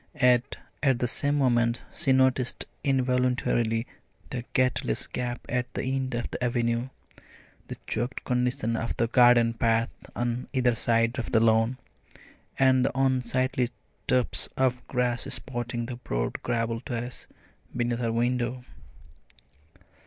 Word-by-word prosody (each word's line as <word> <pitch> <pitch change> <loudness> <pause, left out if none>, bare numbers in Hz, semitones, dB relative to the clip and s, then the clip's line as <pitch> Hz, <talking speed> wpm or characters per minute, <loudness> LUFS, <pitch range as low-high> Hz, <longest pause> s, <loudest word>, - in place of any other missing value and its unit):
Yet 125 0 +3 0.2
at 135 -4 +3
the 125 - 0
same 145 +4 0
moment 120 -3 +2
she 135 - +1
noticed 130 -1 +2 0.2
involuntarily 125 -3 +1 0.5
the 125 -2 -3
gateless 125 - +1
gap 120 -1 -4
at 125 0 -2
the - - -2
end 130 -1 -1
of 120 - -3
the 125 - -4
avenue, 120 0 0 0.8
the - - -7
choked 120 +4 -3
condition 125 -2 0
of 115 +1 -3
the 115 - +2
garden 120 -1 +5
paths 115 0 +1 0.2
on 120 +1 -2
either 125 -2 +3
side 115 +1 +1
of 120 - -4
the 115 - +4
lawn, 115 +2 +3 0.8
and 130 -1 +4
the 130 - -1
unsightly 130 -1 +1 0.4
tufts 125 -1 +1
of 130 -1 +1
grass 125 -1 0
spotting 120 -2 -3
the 120 0 -6
broad - - -3
gravel 115 -1 -1
terrace 120 0 -5 0.5
beneath 120 -1 0
her 115 -2 0
window. 120 +1 -1
125 Hz, 130 wpm, -27 LUFS, 120-130 Hz, 0.8 s, garden